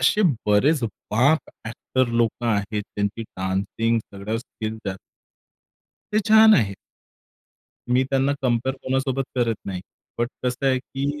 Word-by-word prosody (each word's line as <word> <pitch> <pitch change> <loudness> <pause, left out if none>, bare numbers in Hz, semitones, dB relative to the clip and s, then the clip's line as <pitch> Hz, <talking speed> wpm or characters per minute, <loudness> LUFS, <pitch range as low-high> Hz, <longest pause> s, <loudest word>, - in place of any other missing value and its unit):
असे 210 - +3 0.2
बरेच 130 +8 +3
बाप 120 +8 +2 0.3
ॲक्टर 120 +3 -1
लोकं 120 0 0
आहेत, 105 0 0
त्यांची 100 +3 -1
डान्सिंग 100 +4 -1
सगळ्या 100 +3 -3
स्किल 110 -2 -6
त्या 100 - -2 1.2
ते 215 - +3
छान 220 0 +8
आहे. 100 - +2 1.2
मी 125 +1 +4
त्यांना 135 +1 +2
कंपेअर 125 +1 +1
कोणासोबत 135 0 0
करत 120 -2 +1
नाही. 95 -2 -4 0.4
बट 120 0 +1 0.2
कसं 125 +2 -1
आहे, 130 -1 +3
की 140 +3 -4
120 Hz, 130 wpm, -23 LUFS, 105-135 Hz, 1.2 s, छान